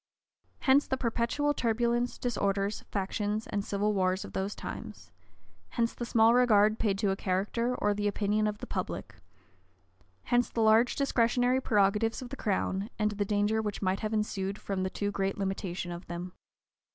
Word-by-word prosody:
Hence 275 +2 +4
the 265 - -1
perpetual 245 +4 0
turbulence, 240 0 0
disorders, 200 -3 -1
factions, 205 +2 -2
and 200 - -2
civil 205 +1 0
wars 190 0 +1
of - - -11
those 195 +2 -2
times: - - -8 0.7
hence 230 -1 +1
the 240 - -5
small 225 0 +5
regard 215 -3 +4
paid 200 -3 +1
to 200 -1 +1
a - - 0
character, 205 +6 -1
or 205 -3 +1
the 205 0 -1
opinion 210 +1 +1
of 210 0 -2
the 250 - -7
public: - - -4 1.1
hence 245 0 +2
the 230 - -2
large 220 +2 +4
discretionary 250 -1 +2
prerogatives 210 0 +2
of 255 - -7
the 275 - -5
crown, 200 -3 -1
and 210 -1 +1
the 205 0 -1
danger 210 +2 +1
which 210 -1 -4
might 185 +1 +1
have 215 -1 -3
ensued 205 -2 -1
from 195 -3 -3
the 185 - 0
too 205 +1 -2
great 195 0 -1
limitation 190 -2 -3
of 175 +1 -8
them. 175 +1 -6
210 Hz, 170 wpm, -30 LUFS, 195-235 Hz, 1.1 s, small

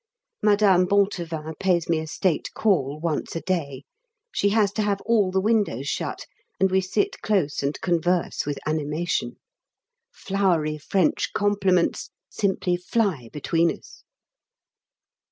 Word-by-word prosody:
Madame 200 -4 +4
Bontevin 170 -6 0
pays 180 -3 +1
me 165 -2 +1
a 160 - -5
state 165 +1 -1
call 155 -9 +1
once 165 -1 -2
a 165 - -2
day; 145 -8 -2 0.5
she 200 - +1
has 205 -1 +2
to 215 - -1
have 205 -1 0
all 215 -4 +2
the 190 +1 +1
windows 200 - 0
shut, - - -3 0.3
and 190 -1 +3
we 190 0 +3
sit 190 +3 -1
close 185 -9 0
and 140 +1 -2
converse 175 0 0
with 145 -1 -3
animation. 155 -3 -1 0.8
Flowery 175 -6 0
French 180 +3 0
compliments 195 -4 +1 0.2
simply 190 -3 0
fly 180 - -1
between 165 +3 +1
us. - - -12
180 Hz, 130 wpm, -24 LUFS, 155-200 Hz, 0.8 s, Madame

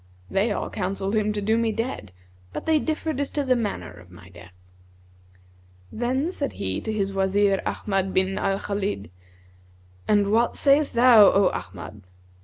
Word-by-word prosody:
They 205 +4 +1
all - - -3
counselled 195 0 -3
him 215 -1 +1
to 205 -1 -3
do 220 +3 +2
me 230 -1 +1
dead, 225 - -4 0.4
but - - -6
they 315 -1 +3
differed 310 -1 -3
as 285 - -1
to 290 - -2
the 255 -1 +3
manner 225 -4 -3
of 90 - -16
my 90 +1 -15
death. 90 0 -15 1.4
Then 260 +8 -1
said 285 -6 -3
he 95 -1 -3
to 220 - -4
his 195 -2 -2
Wazir 195 +1 +2
Ahmad 195 -2 -1
bin 190 +1 0
al 195 0 0
Khбlid, 200 - -4 1.0
'And 205 -1 +2
what 230 +2 +2
sayest 280 0 +2
thou, 235 -3 +7
O 195 -1 +3
Ahmad?' 90 +3 -8
205 Hz, 165 wpm, -24 LUFS, 190-240 Hz, 1.4 s, thou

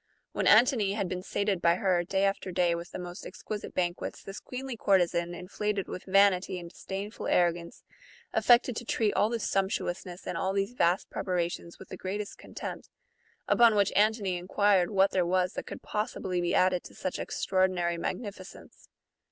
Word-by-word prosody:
AVhen - - +1
Antony 220 -3 +5
had 200 -2 -1
been 180 0 -4
sated 200 -1 -1
by 170 0 +4
her, 180 -2 +1
day 190 +2 0
after 195 -1 0
day, 175 -1 +2
with 170 +1 -5
the - - -7
most 180 +1 -7
exquisite 210 -1 -7
banquets, 175 -1 -2
this 195 +1 -7
queenly 260 0 -6
courtesan, 175 -4 +1
inflated 200 +3 -3
with 180 - -7
vanity 195 -1 +3
and 170 -1 -8
dis - - -15
dainful 200 +3 -5
arrogance, 170 -1 +1 0.5
affected 240 0 +4
to 235 - -4
treat 220 -2 0
all 210 - +2
this 235 -2 -2
sumptuousness 190 -2 -2
and - - -3
all 190 0 0
these 195 +4 -1
vast 175 -6 +1
preparations 175 -2 -3
with 190 - -13
the 185 - -7
greatest 200 +3 -5
contempt; - - -7 0.6
upon 235 -2 +5
which 200 -1 +2
Antony 205 -3 +2
enquired 190 0 +2
what 195 -1 +3
there 185 - +2
was 180 +1 +1
that - - -6
could - - -8
possibly 205 -4 -2
be 175 0 0
added 185 -1 +3
to - - -12
such 185 - -4
extraordinary 185 -3 0
magnificence. 195 -2 -7
190 Hz, 175 wpm, -29 LUFS, 175-205 Hz, 0.6 s, Antony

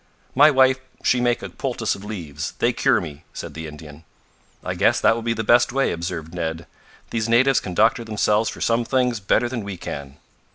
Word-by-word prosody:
"My - - +7
wife 130 -2 +4 0.2
she 125 - +2
make 120 0 +1
a - - -5
poultice 120 -5 -2
of 100 - -9
leaves 80 -8 -6
they - - +1
cure - - +3
me," 75 +1 -8
said - - -7
the 80 0 -6
Indian. 75 0 -11 0.6
"I - - -3
guess - - +2
that - - +4
will 115 - -4
be 115 0 -1
the 110 - -2
best 120 +2 +4
way," 135 +2 +1
observed 85 -1 -5
Ned. 80 -2 -4 0.5
"These 115 -1 -1
natives 130 +3 +4
can 90 -2 -7
doctor 115 +4 +3
themselves 110 0 +1
for - - -9
some 115 +1 +2
things, 125 -2 0
better 110 +4 +1
than 120 -3 -4
we 100 -2 -6
can." 70 -3 -7
110 Hz, 205 wpm, -22 LUFS, 85-120 Hz, 0.6 s, My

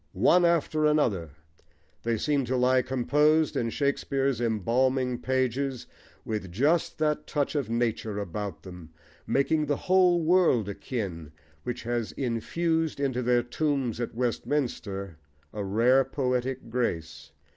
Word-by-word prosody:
One 175 - +4
after 160 -2 +1
another, 115 - +1 0.7
they 115 -1 0
seem 145 +4 +1
to 130 +2 -1
lie 130 +1 +4
composed 150 +5 +2
in 115 - 0
Shakespeare's 135 -1 0
embalming 125 +3 +1
pages, 130 0 -1 0.4
with 105 -5 -4
just 145 - +1
that 150 -1 0
touch 145 -2 -1
of 140 -7 -2
nature 115 -2 -1
about 100 -1 -5
them, 90 -3 -10 0.4
making 150 +3 +1
the 145 -1 0
whole 185 -2 +4
world 165 - +3
akin, 95 - -5 0.3
which 125 +4 -5
has 120 -1 -2
infused 160 +6 -1
into 130 -3 0
their 120 0 +2
tombs 135 -2 -1
at 120 -2 -4
Westminster 115 - -2 0.4
a 105 - -3
rare 120 +7 +3
poetic 130 -2 -2
grace. 85 -10 -3
125 Hz, 125 wpm, -27 LUFS, 115-145 Hz, 0.7 s, One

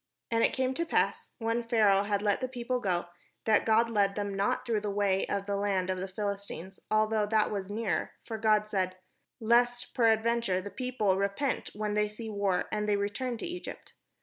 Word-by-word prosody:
And 230 0 +3
it - - +4
came 260 0 0
to 335 - -1
pass, 330 - 0
when 230 +1 0
Pharaoh 210 -4 +4
had 205 0 -1
let 205 +2 +2
the 255 - 0
people 250 0 -2
go, 180 -6 0 0.4
that 220 -1 +3
God 225 +1 +4
led 200 -3 +1
them 205 -1 -2
not 195 +5 0
through 225 -4 0
the 210 - -2
way 200 -1 +1
of 200 -1 -2
the 200 0 -1
land 195 -2 0
of 185 - -2
the 190 - -3
Phihstines, 195 -1 -5
although 215 0 +2
that 215 0 +2
was 200 -2 -3
near; 215 0 -1
for 225 -2 -5
God 215 -1 +3
said, 185 -3 -1 0.4
"Lest 240 +2 +2
peradventure 230 -4 +2
the 200 +2 -7
people 215 -4 0
repent 200 +8 -1
when 210 0 -2
they 210 0 +2
see 220 +1 -7
war, 200 -3 0
and 210 -1 -1
they 205 - +3
return 230 +5 -2
to - - -5
Egypt." 355 +1 -7
210 Hz, 200 wpm, -30 LUFS, 200-230 Hz, 0.4 s, it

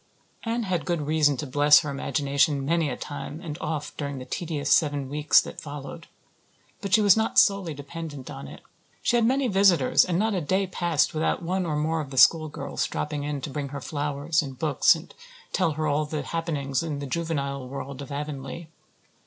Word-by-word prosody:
Anne 230 +1 -2
had 185 -5 -1
good 175 -3 -1
reason 150 -1 +2
to 150 - -4
bless 145 +2 +5
her 150 -3 -4
imagination 140 0 0
many 165 0 +1
a 125 - -4
time 145 +1 -6
and 165 -4 -6
oft 150 -2 -4
during 140 -2 -4
the 130 - -7
tedious 155 +2 -3
seven 145 -3 +2
weeks 150 +2 +4
that - - -6
followed. 145 +3 -8 0.7
But 200 -3 -4
she 220 - +5
was 200 -2 +7
not 220 0 -1
solely 195 -6 +4
dependent 145 -1 -8
on 70 +1 -8
it. - - -11 0.4
She - - +2
had 235 - +3
many 265 +1 +2
visitors 195 +3 +4
and 175 -2 -1
not 220 +3 +1
a 185 - -1
day 190 +5 +1
passed 175 -4 0
without 160 +2 -1
one 180 +1 -1
or 155 - -1
more 160 +2 0
of 145 - -7
the 135 - -8
schoolgirls 155 +2 +3
dropping 150 -1 -3
in 145 -2 -3
to 140 - -5
bring 140 +1 -3
her 140 +1 -6
flowers 145 +3 -1
and 135 -3 -7
books 150 +3 +4
and 165 +1 -11 0.4
tell 170 -5 +1
her 155 +1 -2
all 150 0 +1
the 150 -1 -4
happenings 145 -4 -2
in 160 -3 -3
the 140 - -5
juvenile 140 -3 -3
world 140 0 -6
of 140 - -9
Avonlea. 145 +2 -6
150 Hz, 200 wpm, -26 LUFS, 140-170 Hz, 0.7 s, was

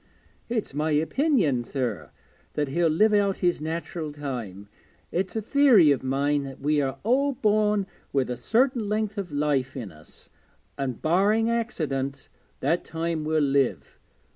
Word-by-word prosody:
'It's 225 - -2
my 150 +2 -1
opinion, 160 - +2
sir, 120 - -3 0.4
that 145 -2 -1
he'll 170 +4 +2
live 210 +8 +3
out 200 -2 +2
his 175 -4 +1
natural 160 0 -4
time. 120 -9 -6 0.4
It's 185 +4 -2
a 220 - -2
theory 230 - +5
of 140 - +1
mine 140 +2 0
that 135 -1 -8
we 150 +1 +1
are 135 -1 -2
all 275 +6 +2
born 210 -3 +2 0.3
with 135 -2 +1
a - - -2
certain 240 - +1
length 215 0 -1
of 185 -5 -5
life 145 -3 0
in 110 -7 -6
us, 75 -1 -14 0.4
and, 130 -4 -4
barring 205 +7 +3
accident, 140 - -2 0.3
that 170 - +1
time 165 -1 -3
we'll 155 -1 +2
live. 140 -2 0
155 Hz, 150 wpm, -26 LUFS, 135-210 Hz, 0.4 s, theory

